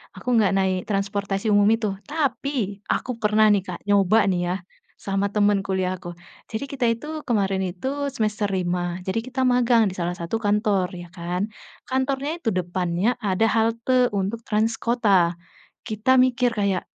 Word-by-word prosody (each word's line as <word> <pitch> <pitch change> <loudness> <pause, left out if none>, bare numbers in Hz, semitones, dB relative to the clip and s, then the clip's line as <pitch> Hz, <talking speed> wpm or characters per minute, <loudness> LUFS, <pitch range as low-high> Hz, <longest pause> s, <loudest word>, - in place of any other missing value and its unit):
aku - - -13
nggak 205 -3 +3
naik 190 -1 +1
transportasi 200 0 -2
umum 205 0 +5
itu. 225 -1 -2 0.2
Tapi 275 -8 -1
aku 255 - -1
pernah 215 0 +4
nih, 200 -2 +1
Kak, - - -10
nyoba 205 +1 +4
nih 180 - 0
ya - - 0 0.4
sama 195 0 -1
temen 205 -1 +2
kuliah 185 -1 -1
aku, 175 -1 -8 0.4
jadi 225 +5 -3
kita 270 -2 -4
itu 235 +6 -9 0.2
kemarin 195 -5 +1
itu 185 +8 -6 0.3
semester 215 -2 0
5, 175 -1 -1
jadi 190 +4 0
kita 260 +1 -3
magang 240 -3 +4
di 185 - -4
salah 175 -1 -2
satu 170 +5 -3
kantor, 205 -3 +1
ya 175 - -10
kan. 180 +3 -2 0.4
Kantornya 270 +2 -1
itu 295 -10 -1
depannya 180 +4 0
ada 200 +2 +2
halte 230 +3 +2
untuk 215 +5 -3
trans 220 +2 0
kota, 195 -8 +2 0.5
kita 220 +3 +2
mikir 250 -1 +1
kayak, 200 -4 0
205 Hz, 160 wpm, -23 LUFS, 190-230 Hz, 0.5 s, umum